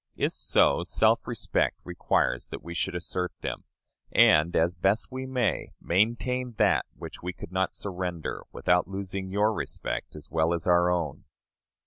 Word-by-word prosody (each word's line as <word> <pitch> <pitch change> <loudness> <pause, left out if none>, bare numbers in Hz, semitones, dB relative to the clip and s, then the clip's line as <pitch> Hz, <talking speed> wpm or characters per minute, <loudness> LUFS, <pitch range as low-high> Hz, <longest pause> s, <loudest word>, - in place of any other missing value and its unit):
If - - 0
so, 70 - +3
self 110 +6 +2
respect 120 -3 0
requires 85 -7 0
that - - -7
we 85 - -7
should 90 +1 -1
assert 90 +1 -2
them; - - -4 0.5
and, 75 +3 +5
as 85 +2 +3
best 95 +8 +1
we 130 +1 -5
may, 125 -5 -1
maintain 120 +6 0
that - - +3
which - - -9
we 90 +1 -4
could 90 - -10
not 95 0 0
surrender 90 -4 -4
without 90 -1 +2
losing 95 0 -4
your 105 +3 +2
respect - - -4
as 75 - -9
well 80 +1 +2
as 85 - -5
our 90 0 +4
own. 85 -5 -2
90 Hz, 155 wpm, -27 LUFS, 85-105 Hz, 0.5 s, and